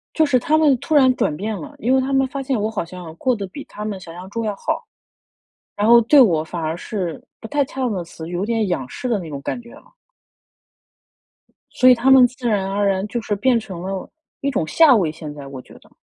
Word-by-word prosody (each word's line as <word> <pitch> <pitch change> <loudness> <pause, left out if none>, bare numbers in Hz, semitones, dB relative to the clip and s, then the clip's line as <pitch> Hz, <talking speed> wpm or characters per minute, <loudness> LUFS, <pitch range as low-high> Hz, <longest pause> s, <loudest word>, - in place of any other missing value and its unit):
就 315 - +4
是 270 -3 +3
他 300 +6 +1
们 295 -4 +4
突 315 - -3
然 260 -3 +5
转 150 - 0
变 210 +4 -3
了， 290 +5 -9
因 255 0 +1
为 265 - +4
他 265 +1 -2
们 270 0 +3
发 275 0 -5
现 260 -5 -1
我 215 - -1
好 215 -6 -3
像 175 -2 -10
过 255 +4 +1
得 200 - -5
比 275 +10 -9
他 210 - -8
们 205 -3 -4
想 165 -2 -11
象 180 +2 -9
中 230 +1 -3
要 210 -2 -2
好。 - - -3 0.9
然 205 +1 +1
后 235 0 +8
对 280 +6 +6
我 170 -11 +4
反 170 +1 -6
而 160 +1 -2
是 180 -3 -5 0.2
不 225 - -8
太 290 -1 +1
恰 265 0 -8
当 250 - 0
的 180 -3 -3
词， 165 -1 -10
有 175 +2 -2
点 225 -2 0
仰 135 -8 -2
视 250 - -5
的 230 -4 +1
那 170 -4 -7
种 140 -2 -6
感 240 - -4
觉 235 0 -15
了。 - - -18 1.8
所 255 - +4
以 255 - +8
他 245 +3 +1
们 260 -2 +8
自 250 -1 -5
然 200 -3 0
而 200 +1 0
然 195 +1 0
就 235 +3 -3
是 210 - -1
变 240 +3 +2
成 185 -5 -8
了 190 0 -5 0.3
一 280 - -1
种 165 - -1
下 315 - +6
位 175 -7 +1
现 155 -2 -8
在， 140 -2 -9
我 135 -2 -8
觉 - - -17
得。 - - -19
215 Hz, 275 characters per minute, -20 LUFS, 180-255 Hz, 1.8 s, 后